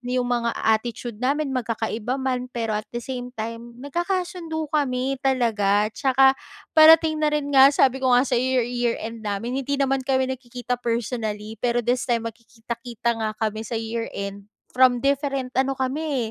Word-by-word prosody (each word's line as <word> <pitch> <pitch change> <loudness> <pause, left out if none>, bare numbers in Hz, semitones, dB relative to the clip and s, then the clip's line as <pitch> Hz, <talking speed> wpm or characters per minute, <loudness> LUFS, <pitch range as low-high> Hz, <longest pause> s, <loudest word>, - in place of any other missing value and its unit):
'yong 250 0 -1
mga 240 -1 0
attitude 225 0 -1
namin. 280 +2 0
Magkakaiba 230 0 -2
man, 255 -2 -2
pero 225 -3 -2
at - - -21
the - - -2
same 250 -2 -5
time, 230 +2 -6
nagkakasundo 345 0 -2
kami 270 -2 0
talaga. 215 -5 +1
Tsaka 265 -1 +4 0.4
parating 315 0 +7
na 305 - +3
rin 290 -1 -2
nga 270 0 +8
sabi 265 -2 +2
ko 260 - +1
nga 250 - +4
sa'yo, 245 -2 +1
year 255 -2 +1
year 240 -1 0
end 225 0 -6
namin, 220 +5 -2
hindi 280 +1 -2
naman 270 -1 +1
kami 260 0 +1
nagkikita 245 -1 -5
personally. 220 -2 -3
Pero 240 -1 0
this 245 +1 0
time 230 -1 +1
magkikita-kita 235 +1 -5
nga 220 - 0
kami 215 0 -2
sa 225 +1 -4
year 225 +1 -3
end 200 +1 -6 0.2
from 250 0 +4
different 275 -2 0
ano 270 0 +1
kami, 265 -3 -2
250 Hz, 165 wpm, -23 LUFS, 230-270 Hz, 0.4 s, nga